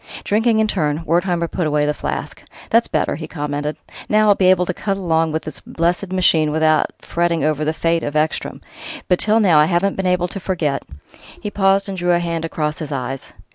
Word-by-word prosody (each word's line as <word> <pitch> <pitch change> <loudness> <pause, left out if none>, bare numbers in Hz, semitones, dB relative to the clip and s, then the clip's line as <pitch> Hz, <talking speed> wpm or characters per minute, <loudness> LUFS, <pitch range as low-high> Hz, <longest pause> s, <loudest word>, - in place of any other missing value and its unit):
Drinking 220 +2 +2
in 220 - +3
turn, 155 -5 -1
Wertheimer 170 +1 +1
put 170 -1 -2
away 150 0 +1
the 150 - +1
flask. - - -5 0.3
"That's 230 +1 +4
better!" - - 0
he 155 -1 -6
commented. 150 -1 -3 0.3
"Now 215 0 +4
I'll - - +8
be 190 -2 +2
able 185 -1 +4
to 180 - -2
cut 195 +2 -2
along 165 -4 +1
with 160 +1 -2
this - - -7
blessed 175 +3 -1
machine 170 -4 +3
without 155 0 +2 0.2
fretting 170 -2 0
over 155 0 0
the 155 - +1
fate 165 +1 0
of 145 - -4
Ekstrom. 155 +1 -1 0.5
But 180 - +2
till 215 +1 +3
now 180 -8 +5
I 150 - +6
haven't 180 +4 0
been 190 -1 -1
able 180 -1 +1
to 195 - -6
forget 165 -7 -1 0.3
" - - -18
He 210 - -3
paused 195 0 +2
and 190 -2 -4
drew 175 0 +2
a 175 - +3
hand 170 -1 -2
across 150 -2 -3
his 150 -2 -6
eyes. 135 -1 -4
170 Hz, 215 wpm, -19 LUFS, 155-190 Hz, 0.5 s, I'll